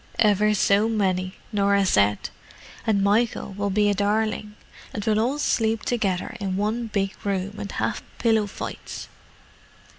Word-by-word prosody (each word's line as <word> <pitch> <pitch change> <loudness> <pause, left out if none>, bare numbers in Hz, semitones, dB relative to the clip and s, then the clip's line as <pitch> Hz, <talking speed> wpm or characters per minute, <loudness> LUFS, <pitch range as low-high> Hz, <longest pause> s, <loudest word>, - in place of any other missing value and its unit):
"Ever 210 0 +4
so 205 +2 +3
many," 185 -3 0 0.2
Norah 200 -1 +3
said. 105 - +2 0.6
"And 200 -3 +3
Michael 210 0 +1
will 205 0 -1
be 205 +1 +2
a 205 - +3
darling: 210 +1 0 0.4
and 205 - -3
we'll 215 -1 +2
all 250 +6 +1
sleep 225 -6 +1
together 200 -5 -1
in 190 -2 -2
one 220 +3 -1
big 195 -2 -1
room, 200 0 -2
and 200 - -5
have - - -1 0.2
pillow 220 -3 +2
fights!" - - -7
205 Hz, 145 wpm, -24 LUFS, 195-220 Hz, 0.6 s, Ever